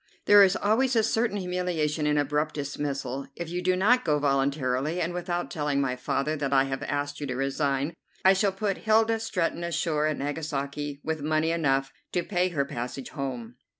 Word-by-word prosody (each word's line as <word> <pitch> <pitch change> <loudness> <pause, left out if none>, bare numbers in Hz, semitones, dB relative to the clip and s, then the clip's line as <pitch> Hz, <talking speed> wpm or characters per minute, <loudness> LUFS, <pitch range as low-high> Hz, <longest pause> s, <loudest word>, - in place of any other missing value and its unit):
"There 205 0 +8
is 195 0 +4
always 240 +5 +2
a 225 - +4
certain 225 -1 +1
humiliation 180 -5 -1
in 150 0 +2
abrupt 150 +2 0
dismissal. 140 -2 -3
If 170 -1 -5
you 175 +1 -2
do 185 0 +2
not 230 +7 +4
go 150 -2 +2
voluntarily, 140 +2 0
and 175 0 -1
without 175 -4 -3
telling 145 -2 0
my 130 -2 0
father 135 +4 -1
that 140 -2 -2
I 135 -1 +5
have 135 0 -3
asked 145 0 -3
you 145 - -3
to 125 - -3
resign, 135 +2 0 0.3
I 190 - +8
shall 195 +1 +2
put 195 0 -2
Hilda 225 +1 +3
Stretton 180 -6 -1
ashore 160 -3 0
at 155 - -1
Nagasaki 145 -1 -3
with 160 -1 -2
money 155 +2 +1
enough 135 -5 +1 0.2
to 175 - +1
pay 180 -1 0
her 145 -5 0
passage 125 0 -5
home." 125 -3 -5
150 Hz, 185 wpm, -27 LUFS, 140-180 Hz, 0.3 s, There